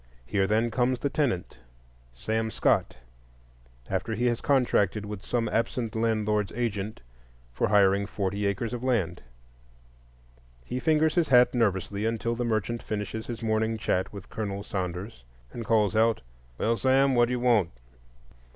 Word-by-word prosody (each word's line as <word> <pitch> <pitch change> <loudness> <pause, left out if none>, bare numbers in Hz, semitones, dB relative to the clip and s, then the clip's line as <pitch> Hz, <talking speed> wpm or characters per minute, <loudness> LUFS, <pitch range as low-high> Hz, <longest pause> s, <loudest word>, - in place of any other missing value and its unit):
Here, 95 +8 +1
then, 110 +3 +1
comes 125 +2 +1
the 140 - -1
tenant, 120 - -1 0.5
Sam 110 - -2
Scott, - - +1 0.9
after 110 - -2
he 120 +3 -1
has 120 -1 +1
contracted 110 -7 +2
with 105 -1 -7
some 115 -2 -1
absent 115 0 -1
landlord's 110 -2 0
agent 110 -3 -3 0.5
for - - 0
hiring 100 -1 +3
forty 100 0 -2
acres 105 +4 -2
of 120 0 -4
land; 95 -10 0 1.4
he 125 - -3
fingers 155 +1 +2
his 170 -3 +2
hat 125 -1 +5
nervously 100 -2 0
until 115 +1 -1
the 120 +1 -2
merchant 115 0 -1
finishes 110 +1 -4
his 115 -1 -6
morning 110 0 0
chat 95 -4 -1
with 100 -2 -9
Colonel 100 -3 -4
Saunders, 90 - -5 0.3
and 115 - -6
calls 110 -2 +2
out, 115 0 +3 0.4
"Well, 115 - +1
Sam, 135 +2 +3
what 120 -1 +4
do 125 - -2
you 125 - -1
want?" 115 -8 +3
110 Hz, 150 wpm, -27 LUFS, 100-120 Hz, 1.4 s, hat